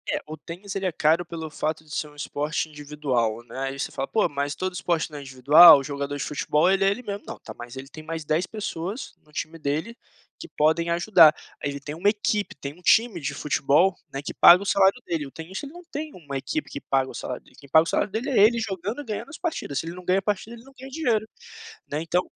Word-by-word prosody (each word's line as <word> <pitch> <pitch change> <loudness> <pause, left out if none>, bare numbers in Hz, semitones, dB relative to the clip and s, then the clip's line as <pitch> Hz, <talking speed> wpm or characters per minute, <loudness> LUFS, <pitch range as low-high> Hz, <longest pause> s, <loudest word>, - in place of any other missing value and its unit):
É, 295 0 0
o 155 - -6
tênis, 175 +6 -9
ele 195 -1 -2
é - - 0
caro 160 +2 +2
pelo 165 -2 -6
fato 155 +1 -3
de 155 - -17
ser 150 - -2
um 145 - -18
esporte 150 +2 -2
individual, 140 -7 -2
né, 130 - -8
aí 135 0 -3
você - - -3
fala: 135 - -3
"Pô, 220 -4 +2
mas 145 -1 -3
todo 185 0 -3
esporte 170 -2 -1
não 150 - -7
é - - -8
individual? 140 +3 +8
Jogador 140 0 -4
de - - -3
futebol, 150 +3 +1
ele 195 0 +2
é 195 - +5
ele 215 +6 -3
mesmo". 205 -2 -5
Não, - - -6
tá, - - -10
mas 120 +1 -9
ele 135 +1 -7
tem 155 +3 -11
mais 160 0 -5
10 155 +5 0
pessoas 205 +1 -5
no 150 - -25
time 160 +2 -5
dele 155 +10 -2 0.4
que 340 - -8
podem 160 +3 +2
ajudar, 170 -2 +6 0.3
aí 145 - 0
ele 140 0 -5
tem 145 +1 -7
uma 170 +6 +2
equipe, 210 -1 -1
tem 140 0 -7
um 175 - -20
time 220 +1 +3
de 140 0 -3
futebol, 150 +6 +2 0.2
né, 135 - -4
que - - -5
paga 180 +3 +8
o - - -9
salário 200 +3 +3
dele. 160 -4 -2
O - - -13
tenista, 185 - -7
ele 285 - -13
não 350 +1 -11
tem 305 +1 -5
uma 145 -6 -8
equipe 300 - -3
que 140 - -7
paga 135 -1 0
o - - -12
salário 125 - -6
dele, - - -22
quem 140 -1 -16
paga 160 +3 +6
o - - -10
salário 205 - 0
dele 225 +7 -2
é 250 - +3
ele 230 +3 +5
jogando 210 +3 -4
e - - -11
ganhando 215 +4 -5
as 315 - -9
partidas, 320 - -3
se - - -2
ele 165 - -5
não 180 +1 -10
ganha 180 +1 +2
a - - +1
partida, 210 +3 -3
ele 230 - -14
não 270 - -17
ganha 265 +2 -9
dinheiro, 245 -7 0 0.6
né, 150 +2 -1
então, 165 +2 +1
165 Hz, 260 wpm, -25 LUFS, 145-200 Hz, 0.6 s, individual